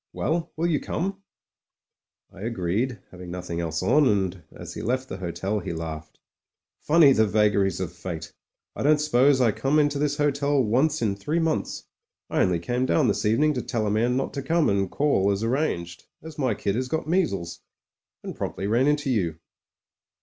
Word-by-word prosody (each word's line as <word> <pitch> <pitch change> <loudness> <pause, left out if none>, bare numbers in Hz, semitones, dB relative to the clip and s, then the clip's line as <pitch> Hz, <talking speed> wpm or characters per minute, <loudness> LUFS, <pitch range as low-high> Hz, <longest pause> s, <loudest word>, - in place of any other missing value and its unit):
Well! 165 +1 -1
will 165 - 0
you 160 -4 +2
come 195 +3 -3 0.6
?" - - -54
I 95 - -11
agreed, 115 +3 -1
having 90 -1 -10
nothing 90 -1 -4
else 80 0 -2
on, 145 +9 +4
and 95 -5 0
as - - -9
he - - -6
left 130 +3 -1
the 95 - -5
hotel, 95 +3 -3
he - - -5
laughed. 80 -1 -7 0.6
"Funny 150 -3 +5
the 110 -3 +3
vagaries 105 -2 +2
of 90 -2 -4
fate. 85 -3 -7 0.4
I - - -5
don't 150 +2 +4
suppose 140 -2 +3
I 120 -3 +4
come 135 +8 0
into 145 -1 +2
this 145 0 0
hotel 145 -1 +1
once 135 +7 +1
in 100 -3 +1
three 145 +11 -2
months. 160 -2 -1 0.5
I - - +2
only 90 -1 +2
came 120 +9 -1
down 135 -5 +3
this 105 - 0
evening 150 +8 +3
to 125 - -2
tell 115 -3 -2
a 105 - 0
man 120 +4 +1
not 135 - -2
to 140 - -3
come 160 +4 +2
and 100 -1 +1
call 135 -8 +1
as 100 +2 -1
arranged, 115 - -2 0.2
as 160 -1 -9
my 130 -6 +1
kid 100 0 -1
has 125 +4 -2
got 160 +3 -2
measles 145 - -1 0.3
— - - -65
and - - -6
promptly 95 - -4
ran 120 +6 +2
into 145 -2 +1
you." 85 -9 0
120 Hz, 195 wpm, -25 LUFS, 95-145 Hz, 0.6 s, Funny